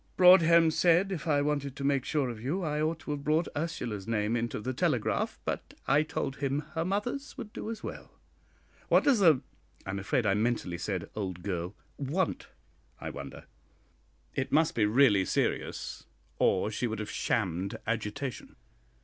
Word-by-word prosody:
"Broadhem 170 -3 +7
said 175 +4 +3
if 170 -5 -4
I 145 -2 +3
wanted 145 -2 -1
to 140 - -6
make 140 -2 +1
sure 145 -5 0
of 110 -2 -9
you 160 +10 -1
I 150 -1 -1
ought 160 +1 0
to 145 - -5
have 145 -1 -3
brought 155 +3 +2
Ursula's 125 - -3
name 110 0 0
into 120 -1 -2
the 130 +4 -3
telegraph, 135 -5 0
but - - -4
I 145 +2 +5
told 150 -3 -3
him 140 +1 -1
her 165 - 0
mother's 210 +10 -3
would 210 - -7
do - - -5
as 225 - -6
well." - - -7 0.8
"What - - +5
does 270 -6 +4
the 160 -9 +5 0.2
" - - -31
I 95 - -3
am 100 - -3
afraid 105 +4 0
I 100 - +3
mentally 105 -5 0
said 95 -4 -3
'old 95 -4 -4
girl' 90 0 -3 0.2
"want, 155 +6 -1 0.5
I - - -5
wonder? - - -8 0.9
It 135 +1 -2
must 160 +1 +3
be 105 -3 +2
really 105 -4 +5
serious, - - -2 0.3
or 95 +3 +2
she 120 +3 -1
would 110 0 -3
have 105 -1 -5
shammed 95 -3 -1
agitation. 115 +4 -3
140 Hz, 175 wpm, -30 LUFS, 105-160 Hz, 0.9 s, Broadhem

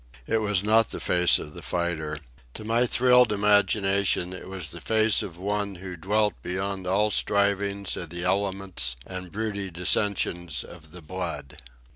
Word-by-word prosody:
It 110 0 +1
was 105 -3 +1
not 110 +1 +4
the - - -5
face 90 0 +4
of 75 - -8
the 85 - -9
fighter. 85 -3 -2 0.4
To - - -6
my 115 +3 +2
thrilled 125 0 +5
imagination 100 -2 +2
it 95 - -9
was 95 -4 -4
the 85 - -9
face 110 -1 +3
of 85 -4 -7
one 100 +1 -2
who 90 0 -7
dwelt 105 +5 +1
beyond 95 0 -3
all 105 +3 +2
strivings 100 -1 0
of 85 - -6
the 85 +1 -5
elements 95 -7 -1
and 90 -2 -7
broody 100 -2 -3
dissensions 90 -2 0
of 80 -3 -14
the 90 -1 -11
blood. 75 -4 -4
95 Hz, 160 wpm, -26 LUFS, 90-105 Hz, 0.4 s, thrilled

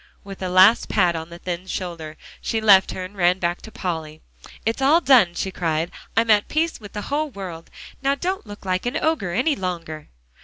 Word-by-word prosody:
with 195 -1 -10
a 185 - -2
last 185 +5 +5
pat 180 -5 +2
on 160 0 -5
the 170 - -10
thin 180 +1 -5
shoulder, 165 -5 -5 0.2
she 225 - -1
left 200 -3 +6
her, 185 - -4
and 195 +3 -12
ran 180 -1 +3
back 175 -1 -2
to 220 - -11
Polly. 160 -5 -4 0.5
"It's 225 +4 -1
all 290 +5 +5
done," 245 - +5
she 190 - -2
cried. 165 -2 -1 0.3
"I'm 225 0 +4
at 210 -1 +4
peace 320 +2 -1
with 205 -3 -12
the 210 - -4
whole 305 +1 0
world. 185 -8 -8 0.3
Now 275 +1 +2
don't 365 - -3
look 205 -1 -11
like 185 +4 -1
an 245 - -1
ogre 310 - 0
any 260 - +1
longer." 165 - -5
190 Hz, 205 wpm, -22 LUFS, 175-225 Hz, 0.5 s, left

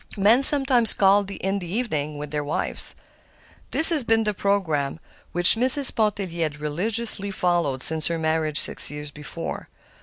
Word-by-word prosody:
Men 215 +6 +1
sometimes 270 -5 +5
called 200 0 0
in 195 0 -6
the 175 -2 -11
evening 155 - -5
with 145 0 -10
their 150 -1 -5
wives. 145 - -7 0.7
This 325 - +5
had 290 -8 0
been 225 0 0
the 210 -1 -4
programme 165 -8 -4 0.3
which 175 +1 +3
Mrs. 260 +4 +5
Pontellier 200 -6 -4
had 150 -1 -8
religiously 200 +7 -1
followed 175 -8 -4
since 160 -1 +3
her 170 - -4
marriage, 160 -1 -3
six - - +2
years 150 0 -9
before. 150 -1 -10
190 Hz, 155 wpm, -20 LUFS, 155-220 Hz, 0.7 s, sometimes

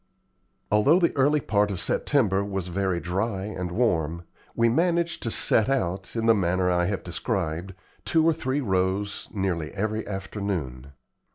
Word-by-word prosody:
Although 105 +11 +5
the 175 -2 +2
early 145 +2 +3
part 105 -3 +1
of 95 -3 -3
September 100 -2 +1
was 95 -3 -4
very 95 -1 -1
dry 95 +3 -2
and 90 -4 -4
warm, 85 -6 0 0.3
we 115 - +3
managed 170 +5 +1
to 115 - -1
set 110 +1 +2
out, 95 -8 -2
in 115 -1 -1
the 115 - +6
manner 90 -2 +1
I 90 0 +2
have 95 -2 -2
described, 90 -1 -3 0.3
two 160 +10 +2
or 165 - +5
three 140 -2 -2
rows 95 -1 -1
nearly 90 -6 -2
every 110 +2 -2
afternoon. 95 - -4
100 Hz, 155 wpm, -25 LUFS, 90-115 Hz, 0.3 s, the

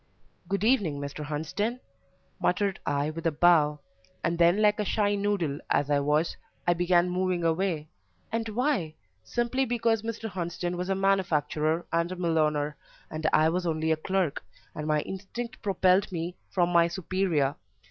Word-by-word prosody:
"Good 200 0 -1
evening, 205 - +2
Mr. 140 +1 -5
Hunsden," 160 - -2 0.6
muttered 195 +1 +1
I 145 +1 0
with 165 +2 -3
a - - +2
bow, 150 -2 +4 0.4
and 170 0 0
then, 170 +4 +5
like 210 0 +3
a - - +2
shy 205 0 +1
noodle 200 -8 0
as 145 0 +1
I 145 - +4
was, 150 +3 +1 0.3
I 175 - +4
began 175 0 +3
moving 180 -1 0
away 165 -2 0 0.4
and 225 0 -2
why? 220 - 0 0.3
Simply 240 - 0
because 230 -3 +1
Mr. 225 0 -4
Hunsden 175 -2 -3
was 180 +2 -3
a 195 - +2
manufacturer 165 -4 +1
and 170 +1 +1
a - - -3
millowner, 155 -4 0 0.3
and 155 0 0
I 155 +1 +4
was 175 +1 -1
only 160 0 0
a - - +4
clerk, 180 0 -1 0.3
and 150 0 -5
my 150 -1 +2
instinct 205 +7 -6
propelled 190 -1 +2
me 175 0 -4
from 175 -2 +1
my 170 -1 +5
superior. 170 -5 0
175 Hz, 160 wpm, -28 LUFS, 155-195 Hz, 0.6 s, then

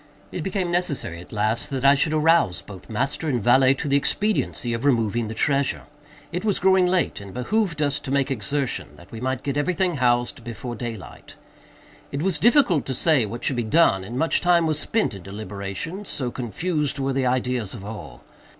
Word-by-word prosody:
It 180 - -4
became 185 0 -2
necessary, 140 - -1
at 90 - -15
last, 110 +6 -1
that 135 -1 -2
I 140 - +8
should 145 +2 +1
arouse 155 - +3
both 100 +1 -12
master 135 +7 -1
and 125 -4 +1
valet 130 +4 +5
to 140 - -4
the 140 0 +3
expediency 170 - 0
of 115 +2 -3
removing 115 -4 +1
the 110 - -6
treasure. 140 +3 +1 0.5
It 180 +3 -3
was 210 -3 +1
growing 190 -1 +4
late, 180 - 0
and 100 - -9
it - - -12
behooved 165 - 0
us 145 -1 0
to 135 - -8
make 140 0 +1
exertion, 135 - -2
that 85 +4 -16
we 115 - -8
might 130 0 -2
get 140 0 -2
every 160 +5 0
thing 180 -4 0
housed 120 -1 +1
before 120 +1 -6
daylight. 115 -3 -8 0.8
It 140 +2 -3
was 185 -5 +2
difficult 235 - +4
to 130 - -2
say 135 -5 +3
what 120 +4 -7
should 135 - +1
be - - +1
done, 110 - +3
and 115 +6 -6
much 165 +4 +2
time 175 -1 +4
was 155 -1 0
spent 220 - 0
in 100 - -9
deliberation—so 105 - -5
confused 145 - -2
were 135 0 -1
the 130 -1 +1
ideas 125 -4 -1
of 100 -3 -9
all. 85 - -9
135 Hz, 200 wpm, -23 LUFS, 115-160 Hz, 0.8 s, I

